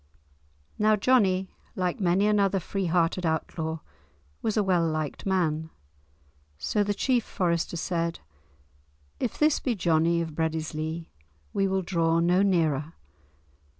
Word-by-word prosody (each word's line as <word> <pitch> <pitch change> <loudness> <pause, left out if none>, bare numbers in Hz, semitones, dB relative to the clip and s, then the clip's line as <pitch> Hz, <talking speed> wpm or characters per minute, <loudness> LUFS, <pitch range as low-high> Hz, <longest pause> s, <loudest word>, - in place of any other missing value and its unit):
Now 215 0 +4
Johnie, 195 -5 +3 0.3
like 180 -2 -1
many 190 +1 +2
another 200 -2 +3
free 190 +1 -3
hearted 170 +1 +1
outlaw, 160 0 -2 0.6
was 220 - -1
a 210 - +3
well 180 -3 +2
liked 155 +2 -3
man. 160 -4 0 0.9
So 205 - 0
the 205 0 -1
chief 245 +2 +1
forester 170 -3 -1
said, 170 0 -2 1.0
"If 240 - -2
this 305 0 +3
be 245 -4 -1
Johnie 170 -2 +2
of 160 - -6
Breadislee 160 +1 -3 0.4
we 195 - +2
will 190 0 0
draw 165 -2 +1
no 175 +3 +3
nearer." 160 -6 +1
175 Hz, 125 wpm, -27 LUFS, 160-195 Hz, 1.0 s, Now